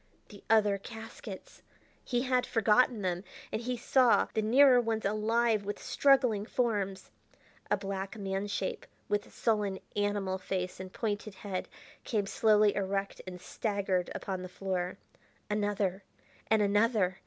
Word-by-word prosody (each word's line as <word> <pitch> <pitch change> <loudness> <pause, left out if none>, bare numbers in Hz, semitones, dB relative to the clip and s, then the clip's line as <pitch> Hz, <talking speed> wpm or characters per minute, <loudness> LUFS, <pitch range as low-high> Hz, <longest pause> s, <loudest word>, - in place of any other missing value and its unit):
The 205 - -13
other 210 -3 +4
caskets! 225 -2 -9 0.4
He 245 -1 0
had 255 -1 +2
forgotten 225 0 +3
them, 180 0 -1 0.3
and 220 - -2
he 250 +1 -2
saw 250 0 +4
the 220 - +1
nearer 250 +3 +6
ones 225 -2 -2
alive 215 +1 +2
with 205 +1 -4
struggling 260 -7 +3
forms. 205 -5 -1 0.6
A - - +3
black 195 +1 -5
man 195 0 -2
shape, 200 -2 -3 0.2
with 205 0 -1
sullen, 210 -4 0 0.2
animal 205 -2 0
face 185 -1 -3
and 185 0 -7
pointed 210 -1 -3
head, 190 -1 -5 0.3
came 215 -5 0
slowly 210 0 +4
erect 195 0 -2
and 180 -1 -7
staggered 195 -2 -1
upon 190 -2 -4
the 185 - -7
floor. 185 -1 -3 0.5
Another 205 -2 0 0.4
and 220 -1 +3
another! 205 -2 +2
205 Hz, 135 wpm, -31 LUFS, 195-225 Hz, 0.6 s, nearer